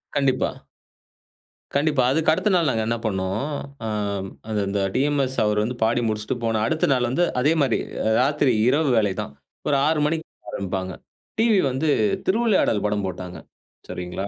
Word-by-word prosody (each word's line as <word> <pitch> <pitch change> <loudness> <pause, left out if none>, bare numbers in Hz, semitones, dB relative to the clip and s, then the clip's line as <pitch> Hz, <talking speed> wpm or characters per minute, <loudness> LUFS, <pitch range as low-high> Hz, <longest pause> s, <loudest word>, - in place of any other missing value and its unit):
கண்டிப்பா. 135 -2 +2 1.3
கண்டிப்பா 145 -3 +2
அதுக்கடுத்த 160 +6 +2
நாள் 170 -5 +3
நாங்க 110 -3 0
என்ன 115 - +1
பண்னோம். 95 +1 -1 0.4
ஆ - - -2 0.6
அது 105 -1 -1
அந்த 100 0 -1
டிஎம்எஸ் 135 -1 +1
அவர் 105 0 +1
வந்து 125 +3 -3
பாடி 120 +2 +2
முடிச்சுட்டு 110 +2 -2
போன 110 -1 +1
அடுத்த 155 - +1
நாள் 125 -2 +1
வந்து 170 +8 +1 0.2
அதே 145 +5 +3
மாதிரி 135 - +2 0.4
ராத்திரி 140 -1 +2 0.2
இரவு 145 +1 +2
வேலை 105 -3 +3
தான். 70 - -7 0.3
ஒரு 145 - +3
6 160 -1 +2
மணிக்கு 160 +1 -1 0.3
ஆரம்பிப்பாங்க. 95 -1 -3 0.5
டிவி 225 -4 +4
வந்து 140 +5 -1 0.4
திருவிளையாடல் 195 - +2
படம் 105 -1 0
போட்டாங்க 90 0 -6 0.5
சரிங்களா? 90 +2 -5
125 Hz, 145 wpm, -23 LUFS, 105-150 Hz, 1.3 s, டிவி